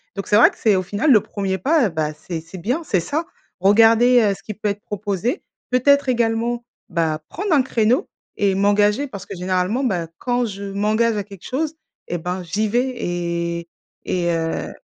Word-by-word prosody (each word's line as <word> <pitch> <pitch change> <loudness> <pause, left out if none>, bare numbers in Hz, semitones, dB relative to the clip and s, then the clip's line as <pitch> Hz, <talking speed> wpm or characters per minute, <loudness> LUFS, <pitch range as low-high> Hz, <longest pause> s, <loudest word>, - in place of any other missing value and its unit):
donc 195 - -4
c'est 205 - +4
vrai 220 - +8
que, - - -17
c'est 210 -4 +3
au - - +1
final, 205 - +1
le 225 - +7
premier 195 -2 -3
pas, 290 +1 +2
eh - - -3
bah, 155 -2 -2
c'est 165 +2 -6
c'est 165 +4 -11
bien, 240 - -1
c'est 190 - +1
ça. 310 - -2 0.3
Regarder, 225 +5 +5
heu, 205 -3 +3
ce - - -16
qui 215 - -6
peut 210 +1 -2
être 205 0 -4
proposé, 205 - -3 0.3
peut-être 280 +3 +3
également, 235 -1 0 0.2
bah, 165 -3 -1
prendre 400 +3 -4
un 285 - +5
créneau 240 -1 +1 0.3
et 200 -2 +2
m'engager 205 +6 +3
parce 200 -7 -9
que, 200 - -7
généralement, 185 +7 0
bah, 180 -9 -1
quand 245 0 0
je 200 -2 -6
m'engage 210 +3 +1
à 205 - -1
quelque 195 -3 -13
chose, 310 +4 -2 0.3
eh 175 - -2
ben, 180 +3 -3
j'y 205 +6 -1
vais 245 +4 +1
et 170 -4 -3 0.4
et 175 -1 0
heu. 165 -1 -2
205 Hz, 200 wpm, -21 LUFS, 180-240 Hz, 0.4 s, vrai